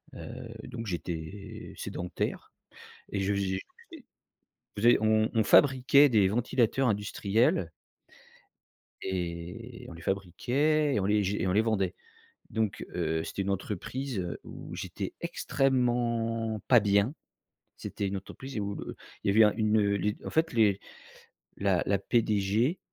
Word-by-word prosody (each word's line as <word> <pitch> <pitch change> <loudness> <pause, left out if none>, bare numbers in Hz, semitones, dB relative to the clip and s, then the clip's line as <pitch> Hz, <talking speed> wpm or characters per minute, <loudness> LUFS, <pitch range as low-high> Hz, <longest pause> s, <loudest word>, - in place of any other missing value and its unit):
Heu, - - -8 0.2
donc 115 -1 -6
j'étais 95 +5 -6
sédentaire 90 0 -4 0.6
et 100 - -1
je 95 +1 +1
faisait 95 -1 -1 0.3
et 310 -6 -11 0.7
faisait 120 +4 +5
on 110 0 +3
on 110 -2 +3
fabriquait 140 +3 +6
des 105 -6 +4
ventilateurs 120 +3 +1
industriels 105 -2 +1 1.3
et 90 +6 -5
on - - -8
les 85 0 -11
fabriquait 135 - +1
et - - +2
on - - -1
les 105 +1 +3
j 100 +1 0
et - - 0
on 90 - +1
les 105 - +4
vendait, 100 -5 0 0.6
donc 110 -3 -2
heu, 80 -2 0
c'était 100 - -4
une 100 - -3
entreprise, 105 +5 -3
heu, 90 -1 -4
où - - -9
j'étais - - -5
extrêmement 115 -4 0
pas 125 -3 +7
bien. 100 +5 +2 0.6
C'était 100 - -4
une 100 +1 -2
entreprise 130 +5 -7
où, 100 0 -2
heu, - - -7 0.3
il - - -2
y - - +5
avait 110 - +3
eu - - +10
un 105 - +3
une, 110 -1 +3
heu, 100 0 +1
en - - -3
fait, 160 -1 +1
les 105 -4 +3 0.8
la 95 -3 +2
la 100 0 +1
PDG 110 - +1
105 Hz, 145 wpm, -29 LUFS, 95-120 Hz, 1.3 s, eu